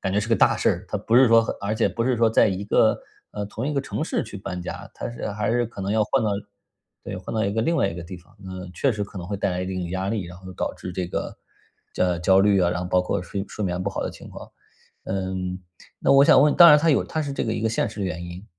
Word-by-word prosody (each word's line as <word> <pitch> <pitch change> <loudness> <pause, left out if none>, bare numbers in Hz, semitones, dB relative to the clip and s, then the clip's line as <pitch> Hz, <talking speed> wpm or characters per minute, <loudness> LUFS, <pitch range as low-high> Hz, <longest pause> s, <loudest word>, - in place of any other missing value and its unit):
感 95 - -2
觉 100 - +1
是 105 - -1
个 115 - +2
大 - - +4
事 - - +2
儿， - - -3
它 - - -2
不 115 - -1
是 130 -1 +7
说 115 0 +6
很 - - -3
而 100 +2 -2
且 - - +2
不 115 - -2
是 125 +1 +1
说 115 -1 +3
在 110 - +4
一 95 +1 -3
个 - - +3 0.3
呃， 105 - -4
同 110 +5 -5
一 150 - -2
个 140 - +1
城 140 - -4
市 160 - -1
去 105 -2 -9
搬 90 -2 -5
家， - - -7
它 - - -5
是 120 - -5
还 105 0 -1
是 120 +1 +1
可 105 -3 -8
能 100 +2 -1
要 110 - +3
换 115 +3 0
到 105 - +1 0.7
对， - - -5
换 - - -7
到 110 - +1
一 100 - -1
个 110 - 0
另 165 +8 +1
外 - - +2
一 - - -5
个 85 - -6
地 85 +2 -8
方。 90 +4 -20
呃， 95 -1 -7
确 130 +10 +1
实 105 -2 -2
可 100 -1 -10
能 90 - -7
会 100 - -2
带 100 - -1
来 90 0 -2
一 90 - -3
定 95 0 -3
的 85 - -5
压 95 +1 -2
力， 105 -2 -2
然 90 +1 -10
后 95 0 -11
导 - - -2
致 90 - -8
这 90 -1 -3
个 - - -4 0.6
焦 90 -2 0
焦 95 +2 +4
虑 100 0 +4
啊， 90 -2 +3
然 90 - -2
后 90 - -5
包 90 0 +2
括 90 - -2
睡 95 +2 -4
睡 105 - -6
眠 90 -2 -2
不 100 - -2
好 - - -3
的 - - -3
情 - - -12
况。 - - -11 0.5
嗯， 95 -1 -3 0.4
那 - - +3
我 140 - +7
想 130 - +6
问， 150 0 +4
当 175 - +9
然 150 -2 +8
它 160 +2 +3
有 140 - +3
它 160 - -3
是 145 -2 -4
这 - - -2
个 110 - -1
一 110 - -3
个 115 - +2
现 115 - 0
实 105 -1 -6
原 85 -3 -3
因， 90 +3 -9
100 Hz, 335 characters per minute, -24 LUFS, 90-115 Hz, 0.7 s, 当